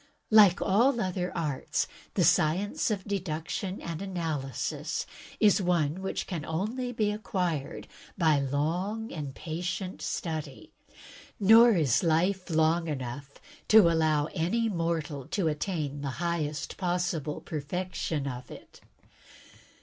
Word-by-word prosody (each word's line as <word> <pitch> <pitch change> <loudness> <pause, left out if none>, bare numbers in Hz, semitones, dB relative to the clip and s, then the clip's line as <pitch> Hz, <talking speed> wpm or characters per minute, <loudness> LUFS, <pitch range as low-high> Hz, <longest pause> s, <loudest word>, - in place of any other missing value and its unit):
Like 205 -5 +7
all 235 +6 +3
other 180 -3 -2
arts, 150 -5 -1 0.3
the - - +3
Science 195 - +2
of 205 -3 -2
Deduction 185 0 -3
and 165 0 -5
Analysis 160 - -3 0.3
is 210 -1 +5
one 175 -2 +1
which 190 - -3
can 170 -5 -4
only 215 - -2
be 215 -3 0
acquired 180 -8 -3 0.3
by 160 -5 +4
long 170 - -1
and 145 -4 -6
patient 180 +3 -4
study, 155 -5 -4 0.7
nor 225 +4 +7
is 150 - +2
life 180 +3 +1
long 160 +1 +2
enough 140 -1 -5 0.3
to 215 -6 +7
allow 155 -2 +2
any 225 +8 0
mortal 165 -6 -2
to 190 -5 0
attain 150 -2 -2
the 140 - -3
highest 165 -3 -2
possible 175 -5 -1
perfection 160 -1 -3
of 125 -2 -6
it. - - -13
170 Hz, 120 wpm, -29 LUFS, 150-190 Hz, 0.7 s, Like